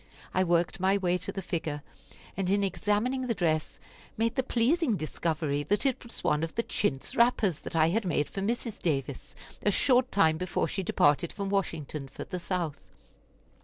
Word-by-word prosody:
I 185 - +3
worked 175 +1 +1
my 190 +2 +3
way 180 -2 +1
to - - -4
the 195 - -5
figure, 155 -5 -3 0.5
and 190 -2 -1
in 200 +1 +3
examining 215 +7 0
the 230 - 0
dress 155 -4 0 0.4
made 230 +1 +1
the - - +1
pleasing 255 - +2
discovery 155 -2 -1
that 205 - 0
it 265 -3 +1
was 235 - -7
one 150 - +2
of 165 0 -3
the 230 - +1
chintz 135 -14 -2
wrappers 230 -8 +3
that - - -7
I 160 0 +4
had 220 +6 +1
made 155 -5 0
for 195 - -5
Mrs. 230 +2 -2
Davis, 140 -5 -2 0.3
a - - +2
short 255 +4 +3
time 160 -5 +4
before 180 -2 0
she 195 - -2
departed 150 -2 +2
from 200 -1 -4
Washington 155 -7 -2
for 135 - -7
the 180 - -5
South. 170 -4 -3
185 Hz, 185 wpm, -29 LUFS, 160-215 Hz, 0.5 s, I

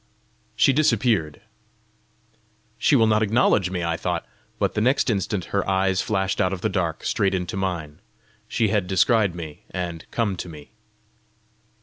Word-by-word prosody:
She 135 - +4
disappeared. 120 - +1 1.4
"She - - +4
will 115 -4 +5
not 110 -1 +3
acknowledge 105 -3 +3
me!" 90 -2 -3
I 85 0 -1
thought. 90 +1 -3 0.3
But 100 -3 0
the 105 - 0
next 130 +1 +2
instant 100 -2 -2
her 100 -1 0
eyes 95 0 +2
flashed 95 -2 -1
out 90 - +2
of 95 -2 -4
the - - 0
dark 85 -4 -2
straight 100 -3 +1
into 90 -1 -3
mine. 85 -4 -3 0.5
She 110 -1 +1
had 100 -3 0
descried 95 0 +2
me 80 -4 -8
and 85 -3 -5
come 105 -5 -1
to 85 - -6
me! 75 -3 -12
95 Hz, 155 wpm, -23 LUFS, 90-110 Hz, 1.4 s, will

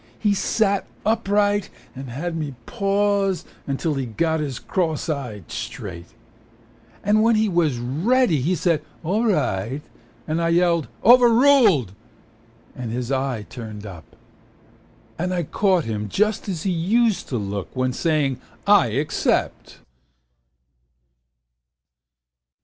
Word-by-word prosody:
He 210 -2 +1
sat 200 0 +1 0.2
upright 205 -2 +1 0.3
and 135 0 -7
had 165 +8 -4
me 150 -4 -4
pause 200 -2 0 0.3
Till 160 +1 -1
he 135 -3 -3
got 160 +8 0
his 140 -5 -3
cross 165 -4 -2
eye 125 - -4
straight. 105 -7 -7 1.0
Then 210 +1 +4
when 230 +1 +4
he 215 0 +2
was 170 -8 +1
ready 160 - +1
he 175 +8 +1
said 165 -2 +1 0.2
"all 205 +8 0
right." 135 - 0 0.4
And 160 +2 -1
I 165 - +1
yelled 170 -2 +2 0.2
"overruled" 235 - +6 0.8
and 120 -3 -5
his 125 +2 -3
eye 130 -5 -1
turned 110 -4 -8
up. 90 -6 -11 1.0
And 180 +2 -1
I 175 - 0
caught 185 +2 +1
him 105 -2 -3
just 210 - 0
as 170 -5 -3
he 195 - 0
used 210 +6 +1
to 125 - -1
look 100 -2 -4
When 130 0 0
saying 145 -3 0 0.2
"I 200 -10 +5
except." 140 +7 -1
165 Hz, 120 wpm, -22 LUFS, 125-200 Hz, 1.0 s, overruled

